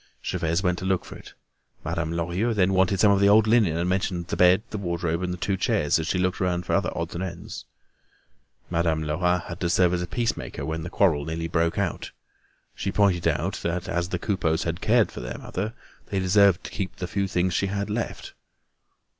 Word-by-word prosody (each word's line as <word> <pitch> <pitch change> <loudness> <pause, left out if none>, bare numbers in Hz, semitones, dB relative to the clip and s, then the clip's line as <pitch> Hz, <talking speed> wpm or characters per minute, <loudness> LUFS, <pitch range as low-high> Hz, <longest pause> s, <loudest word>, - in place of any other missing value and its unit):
Gervaise 85 +3 -1
went 90 -2 +1
to - - -5
look 95 -1 0
for - - -10
it. - - -13 0.5
Madame 80 0 -2
Lorilleux 90 +7 -1
then 95 -1 +3
wanted 95 0 +2
some 105 0 +6
of 100 - +3
the 100 0 +5
old 110 +1 +6
linen 110 -8 +3
and 85 +1 0
mentioned 90 -1 -1
the - - -1
bed, 90 +3 +5
the 105 - -3
wardrobe, 85 -2 -2
and 90 -1 -2
the 90 - -4
two 95 +2 -1
chairs 90 - +1
as 80 - -3
she 90 - 0
looked 95 +1 0
around 90 -1 0
for - - -2
other - - +1
odds - - -3
and 85 - -3
ends. 85 -2 -7 1.1
Madame 85 -2 +1
Lerat 90 +3 0
had 85 +1 -8
to 85 - 0
serve 90 0 +3
as 90 0 0
peace 115 +4 0
maker - - -6
when 80 0 -3
a 85 - -5
quarrel 85 -7 +2
nearly 80 +2 -3
broke 85 0 0
out. 100 -4 -2 0.6
She 95 - -3
pointed 95 -5 +2
out - - -1
that 85 +1 -2
as 85 +1 -1
the 90 - -1
Coupeaus 85 -3 0
had 85 +1 -3
cared 115 0 +3
for - - -8
their - - -5
mother, 105 +5 -4 0.3
they 100 - -3
deserved 95 0 +4
to - - -8
keep 100 -5 -4
the 90 - -4
few 100 +2 -1
things 90 0 0
she 100 - +1
had 100 +1 -2
left. 115 +2 -4
90 Hz, 220 wpm, -25 LUFS, 85-100 Hz, 1.1 s, some